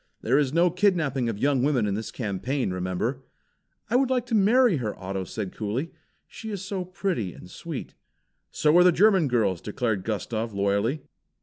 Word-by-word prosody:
There 130 +5 +3
is 140 -3 +1
no 170 +3 +3
kidnapping 165 - +1
of 110 - -3
young 135 +2 +2
women 130 -5 +2
in 100 - -1
this 110 +2 -4
campaign, 120 +2 -2
remember!" 95 +9 -2 0.6
"I 230 - -1
would 260 0 +3
like 250 -2 +1
to 240 - -6
marry 220 -1 +4
her," 110 -5 -3 0.3
said 100 0 -5
Otto - - -24
coolly. 115 +10 -3 0.3
"She 220 - -9
is 200 -3 -5
so 190 -1 -3
pretty 180 - -3
and - - -12
sweet." - - -7 0.6
"So 150 +1 +2
are - - +7
the 180 - +6
German 190 -2 +4
girls," 105 -8 +1
declared 105 -2 -2
Gustav, 110 +1 -3
loyally. 100 +8 0
135 Hz, 180 wpm, -26 LUFS, -, 0.6 s, are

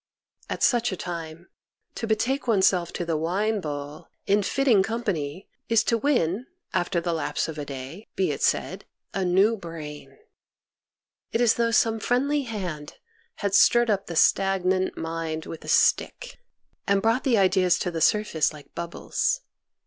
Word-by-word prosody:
At - - -3
such 240 -2 +3
a 185 - -4
time, 170 -1 -6 0.5
to 225 - -4
betake 245 +6 0
oneself 190 -5 +3
to 175 - -3
the 165 -1 -1
wine 195 +7 0
bowl, 145 -1 -6 0.2
in 205 +1 +3
fitting 245 0 +3
com 225 +4 -2
pany, 165 -3 -3 0.2
is 230 -2 +4
to 230 - +1
win, 230 - 0 0.3
after 175 0 0
the 170 0 -2
lapse 155 -2 -1
of 155 -2 -6
a 145 - -4
day, 140 +9 -8
be 185 -5 +1
it 140 - -5
said, - - 0 0.3
a 195 - -1
new 190 +5 +3
brain. 165 -6 -9 1.1
It 230 - 0
is 240 -2 +5
as - - 0
though 235 0 +2
some 225 -1 +2
friendly 275 +6 +1
hand 180 -10 -5 0.5
had 200 - 0
stirred 240 +3 +5
up 195 -1 -1
the 170 - -5
stagnant 190 +1 +2
mind 160 -1 -4
with 165 - -8
a - - -11
stick, - - +1 0.5
and 200 0 +3
brought 225 +5 +1
the 245 -4 +3
ideas 185 -2 +3
to 180 - -2
the 165 -1 -4
surface 210 -5 +2
like 150 -2 -14
bubbles. 170 - -2
190 Hz, 165 wpm, -25 LUFS, 165-225 Hz, 1.1 s, is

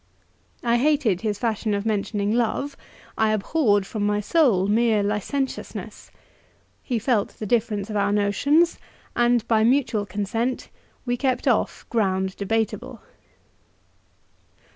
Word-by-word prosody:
I 235 0 +3
hated 265 - +2
his 210 -3 -1
fashion 220 -2 -1
of 200 +1 -3
mentioning 205 -1 -1
love; 245 +4 -1 0.4
I 220 -1 +3
abhorred, 210 -2 +1
from 210 +1 -4
my 205 0 +1
soul, 215 - +3
mere 215 0 +2
licentiousness. 210 +7 -4 0.7
He 245 - -2
felt 225 -2 0
the 215 - -5
difference 210 -2 0
of - - -4
our 200 0 +1
notions, 280 - +2 0.4
and, 240 -1 +2
by 220 -1 +3
mutual 235 -4 +2
consent, 225 +5 -2 0.4
we 245 -1 -1
kept 260 0 -1
off 240 -4 0
ground 190 -4 0
debateable. 220 +2 -2
220 Hz, 120 wpm, -24 LUFS, 205-245 Hz, 0.7 s, I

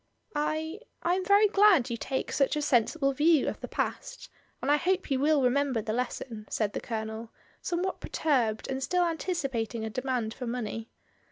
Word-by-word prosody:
"I 315 +4 -1
— - - -30
I 345 - +2
am 370 +1 0
very 405 +3 +5
glad 390 - +5
you - - 0
take 265 +3 -3
such 275 0 +2
a 300 - 0
sensible 275 +2 +2
view 305 +1 +4
of - - -3
the - - -5
past, - - -4 0.3
and - - 0
I 295 - +5
hope 370 0 0
you 265 - +2
will 295 0 +3
remember 260 -1 +2
the 215 0 -3
lesson," 235 -3 -4
said 210 -2 -1
the - - -3
Colonel, 220 0 -4 0.3
somewhat 360 +2 -2
perturbed 240 -8 0
and 265 0 -3
still 360 +6 +2
anticipating 270 - -2
a 220 - -4
demand 250 -2 -2
for 250 0 -6
money. 225 -1 -4
270 Hz, 185 wpm, -29 LUFS, 230-325 Hz, 0.3 s, very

